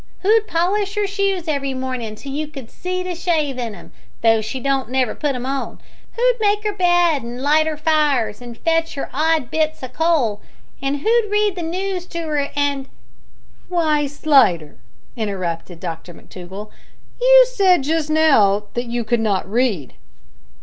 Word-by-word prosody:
Who'd 430 +2 +3
polish 395 +4 0
'er 415 - +2
shoes 395 -3 -1
every 275 -3 -1
mornin' 255 -4 -4
till 275 +6 -9
you 300 +2 -3
could 270 -6 -10
see 365 0 -3
to 365 0 -3
shave 310 -6 -1
in 230 -4 -4
'em, - - -14 0.3
though 225 -1 +4
she 220 +5 -4
don't 270 -2 -1
never 255 -3 +1
put 290 -3 -2
'em 250 0 -4
on? 270 0 -3 0.3
Who'd - - +2
make 420 0 +1
'er 420 - 0
bed 350 -5 +3
an' 235 +1 -6
light 310 +2 +3
'er 310 -1 -2
fires 295 -8 +1
an' 240 -1 -9
fetch 330 +3 0
'er - - -4
odd 310 -2 +1
bits 315 -2 -1
o' - - -3
coal? 255 -7 +1 0.4
An' 275 +1 0
who'd 440 +8 +1
read 420 -1 +1
the 355 - -4
noos 365 +2 -3
to 335 -1 -5
'er, 295 -3 -1
an' 285 -2 0 0.4
" - - -33
"Why, 310 -5 +1
Slidder," 270 - +2 0.4
interrupted 180 -5 -4
Dr 165 0 -7
McTougall, 190 +4 -10 0.5
"you - - +8
said 370 - +4
just 310 +1 0
now 225 -11 +4
that 240 +1 -2
you 235 0 -2
could 235 +2 0
not 205 -5 0
read." 210 - 0
290 Hz, 170 wpm, -20 LUFS, 240-350 Hz, 0.5 s, you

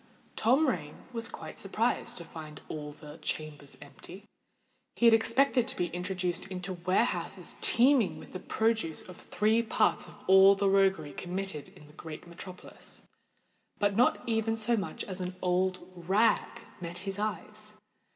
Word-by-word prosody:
Tom 265 +8 +3
Rain 150 - -2 0.2
was 230 -1 -2
quite - - -9
surprised - - -1
to 170 - -5
find 155 -2 -9
all 150 -1 -5
the 150 +1 -12
chambers 150 -2 -5
empty. 170 +7 -12 0.7
He 235 - +1
had 230 - +8
expected 245 +2 +3
to - - -1
be 175 -1 -1
introduced 180 0 -2
into 185 0 -5
warehouses 185 +7 -1
teeming 245 -3 +4
with - - -12
the 185 - -4
produce 220 -6 0
of 180 - -11
three 220 +2 +1
parts 220 -2 +1
of - - -13
all 190 +1 +8
the 200 0 +1
roguery 190 -7 +2
committed 180 -2 -5
in 150 - -15
the 150 - -17
great 160 +1 -9
metropolis: 180 +1 -10 0.7
but 205 -1 +1
not 240 +2 +3
even 225 -1 +1
so 230 +2 +3
much 200 -4 -3
as 185 -1 -5
an 180 0 -4
old 185 0 0
rag 195 +6 +1 0.2
met 170 0 -5
his 195 0 -4
eyes. 215 0 -5
190 Hz, 155 wpm, -30 LUFS, 175-220 Hz, 0.7 s, had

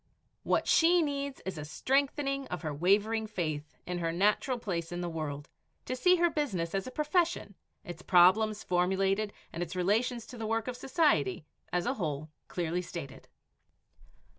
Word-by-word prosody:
What - - +1
she 340 +1 +5
needs 280 -2 -3
is 185 -4 -4
a - - -5
strengthening 275 - 0
of 180 0 -5
her 155 -2 -2
wavering 205 +7 +2
faith 155 -7 -4
in 180 0 -3
her 165 -1 0
natural 210 +8 +2
place 175 -7 -3
in 175 0 -3
the 175 - -2
world, 150 -3 -4 0.4
to 255 - -2
see 360 +8 +5
her 345 -1 +3
business 190 - -1
as 195 +2 -1
a - - -6
profession, 305 - 0 0.3
its 175 -2 -8
problems 205 +4 +4
formulated 190 +3 +1 0.2
and 170 - -4
its 175 +1 -4
relations 225 +6 +1
to 245 - -10
the 220 - -3
work 225 +1 -1
of 250 - -3
society, 245 - +1 0.3
as 180 0 0
a 250 - +1
whole, 155 - -3 0.2
clearly 175 0 -2
stated. 165 -6 -8
195 Hz, 165 wpm, -31 LUFS, 170-255 Hz, 0.4 s, she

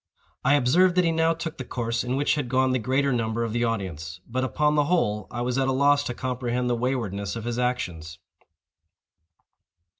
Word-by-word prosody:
I 140 - +4
observed 170 +8 +4
that 180 - +4
he 165 - +3
now 165 0 +2
took 165 -2 -6
the - - -3
course 120 -1 -2
in 125 +1 -2
which 145 +2 +2
had 145 -5 -2
gone 130 +1 +2
the 130 - +1
greater 135 +4 +1
number 115 -1 -1
of 115 -2 -3
the 120 0 0
audience—but, 95 - -3
upon 150 +3 +1
the 150 -1 +3
whole, 105 - 0
I 120 - -4
was 125 +2 0
at 135 - +1
a - - +2
loss 145 +2 +3
to 120 - -3
comprehend 125 -1 -2
the - - +2
waywardness 115 -6 -2
of 115 - -5
his 120 +1 -3
actions. 90 -10 -2
125 Hz, 200 wpm, -25 LUFS, 115-140 Hz, -, I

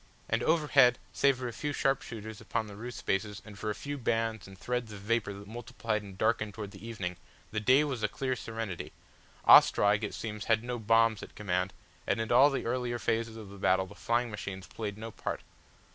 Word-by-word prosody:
And - - +1
overhead 145 -6 +5 0.2
save 140 -2 +3
for 125 -1 -4
a 120 - -5
few 145 +4 -3
sharpshooters 115 -6 -2
upon 110 - -2
the 105 -1 -10
roof 120 +4 -7
spaces 100 +2 -1
and 105 -2 -10
for 110 - -2
a 105 - -1
few 145 0 -5
bands 115 -3 -1
and 95 0 -12
threads 120 +2 -2
of 100 -2 -8
vapour 110 0 0
that 100 +1 -10
multiplied 115 -1 -3
and 100 -2 -11
darkened 110 -1 +1
towards 105 -3 -6
the 95 0 -12
evening, 100 -6 -4 0.3
the 110 - -1
day 130 +7 +5
was 135 -6 -2
a 105 - +2
clear 130 +4 -2
serenity. 110 -6 -5 0.5
Ostrog 105 +1 +7
it 105 - -3
seems 105 -2 -5
had 115 -1 +2
no 120 0 -3
bombs 115 0 +3
at - - -10
command 90 -2 -1 0.4
and - - +1
in 115 +1 -2
all 130 +4 +7
the 135 - -2
earlier 120 0 -1
phases 115 -1 -1
of 110 -3 -9
the 100 - -11
battle 95 +1 +3
the 95 - -12
flying 120 0 0
machines 100 -2 -6
played 105 -1 -5
no 110 +1 -6
part. - - -4
110 Hz, 210 wpm, -31 LUFS, 105-120 Hz, 0.5 s, Ostrog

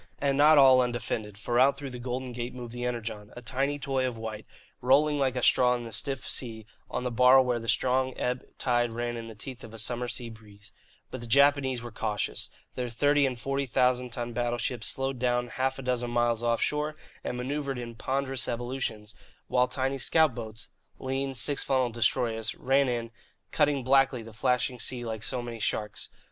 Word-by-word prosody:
And 140 -1 +1
not 150 +2 +6
all 130 -2 +8
undefended, 120 -4 -3
for 120 +3 0
out 135 +2 +5
through 140 -2 -6
the 125 - -7
Golden 125 +1 -4
Gate 120 +1 -5
moved 120 -2 -7
the 120 0 -4
Energon, 115 -4 -4
a - - -7
tiny 135 +5 -1
toy 135 -2 -1
of 120 -2 -5
white, 110 -1 -6 0.3
rolling 145 +4 +4
like 130 -2 +1
a 125 - -2
straw 125 -1 +5
in 120 - -5
the 115 - -8
stiff 135 +2 -3
sea 110 -4 -2 0.2
on - - -3
the 125 - -2
bar 125 +3 +7
where 120 -2 -1
a 115 - -4
strong 130 0 +1
ebb 125 0 -1
tide 120 -2 +1
ran 120 +1 -2
in 115 -1 -6
the 110 - -9
teeth 125 +3 -9
of 115 - -9
the 115 - -11
summer 120 +3 -2
sea 120 0 -4
breeze. 105 -1 -14 0.4
But 130 - -6
the 120 - -7
Japanese 135 -1 +3
were 120 - -7
cautious. 105 -2 -3 0.2
Their 125 -1 -3
thirty 145 +4 +3
and 125 -2 -4
forty 135 +2 -1
thousand 125 0 +2
ton 120 0 -5
battleships 120 0 -2
slowed 135 -1 -1
down 120 0 +1
half 130 +2 -1
a 135 - -7
dozen 125 -1 -1
miles 120 -1 +1
offshore 150 +6 0 0.3
and 125 - -3
manoeuvred 135 +1 -2
in 120 -1 -6
ponderous 135 +2 -1
evolutions, 120 -3 -3 0.4
while 125 0 +3
tiny 135 +2 -1
scout 155 +2 +3
boats 110 -1 -6 0.3
(lean, 135 +1 -2
six 130 +5 +2
funnelled 130 -3 +1
destroyers) 115 -1 +1
ran 135 0 +2
in, 115 -1 -2 0.4
cutting 145 -4 +2
blackly 135 -3 +3
the 115 - -11
flashing 125 +2 0
sea 120 0 -3
like 110 -2 -4
so 125 +2 -2
many 120 -1 -6
sharks. 105 0 -2
125 Hz, 195 wpm, -28 LUFS, 115-135 Hz, 0.4 s, all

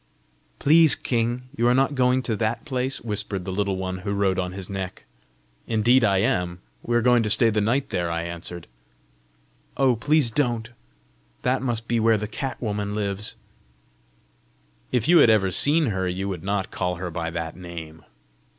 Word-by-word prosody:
"Please, 160 +1 +5
king, 120 +1 -1
you 120 -3 +1
are 125 - +4
not 135 +2 +2
going 130 -1 +2
to 115 -2 -1
that 115 +1 -2
place?" 130 -2 -2
whispered 100 -4 -3
the 95 - -4
Little 100 0 -1
One 95 -1 -4
who 100 +2 -3
rode 95 -2 +1
on 90 -1 -2
his 95 -1 -5
neck. 95 -2 -6 0.6
"Indeed 120 +3 +3
I 100 -3 +3
am! 90 -5 0 0.2
We 120 - -2
are 120 - +2
going 125 -1 +4
to 110 - -1
stay 115 +1 +4
the 105 0 +1
night 130 +6 0
there," 85 -1 -1
I 85 0 -2
answered. 85 0 -6 1.1
"Oh, 130 -3 +3
please, 145 +1 +2
don't! 120 -3 -1 0.7
That 125 +1 +1
must 115 -3 -2
be 120 -1 +1
where 110 0 +3
the 105 0 -4
cat 130 +4 -5
woman 105 -2 -3
lives!" 105 0 -3 1.6
"If 120 -3 +1
you 170 0 +6
had 120 - +6
ever 100 -4 +3
seen 145 - +4
her, 95 -1 -1
you 95 +2 -3
would 95 -4 -4
not 100 +1 -2
call 90 -1 -2
her 90 0 -5
by 85 0 -3
that 80 -1 -5
name!" 80 -3 -9
105 Hz, 180 wpm, -24 LUFS, 95-125 Hz, 1.6 s, you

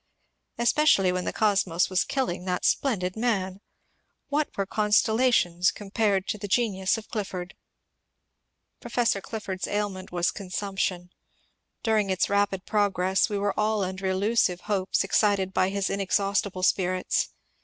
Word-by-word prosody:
Especially 235 -6 +3
when 180 0 -2
the - - -1
cosmos 195 -5 +2
was 185 -1 +1
killing 255 -11 -2
that 180 -1 -2
splendid 185 -9 +1
man. 200 -5 -1 0.7
What 295 +1 0
were 195 - 0
constellations 210 -3 +2
compared 200 -1 -1
to 210 - -2
the 205 - -5
genius 195 -2 +1
of 220 - -9
Clifford? 190 -4 -5 1.3
Professor 235 -4 0
Clifford's 195 -3 -5
ailment 205 -2 -3
was 175 0 +1
consimiption; 190 -2 -3 0.7
during 215 -3 +1
its 190 +1 0
rapid 200 -2 +1
progress 190 -3 +1
we 205 - -2
were 200 0 0
all 215 0 +1
imder 190 0 -4
illusive 190 -1 +1
hopes 195 -3 0
excited 195 -1 +1
by 185 0 +2
his 200 0 -1
inexhaustible 195 -1 0
spirits. 185 -1 +1
195 Hz, 130 wpm, -26 LUFS, 185-215 Hz, 1.3 s, Especially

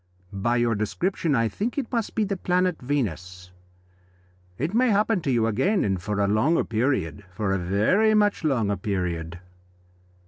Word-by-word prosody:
By 120 +5 0
your 120 -1 +2
description 145 - -1
I 115 -2 +2
think 220 - -3
it 270 -4 -3
must 230 -4 -2
be 220 - +2
the 200 -1 -1
planet 180 -1 0
Venus. 90 - -3 1.1
It 155 - -2
may 250 +2 +3
happen 210 -1 +2
to 145 - -3
you 115 -3 +2
again, 185 - +1
and 95 -3 -1
for 105 +2 -3
a 100 - +2
longer 110 +11 +2
period 110 - -1
for 95 +2 -2
a 95 - 0
very 110 - +2
much 205 -3 +2
longer 115 -9 +1
period." 90 -5 -3
120 Hz, 165 wpm, -25 LUFS, -, 1.1 s, may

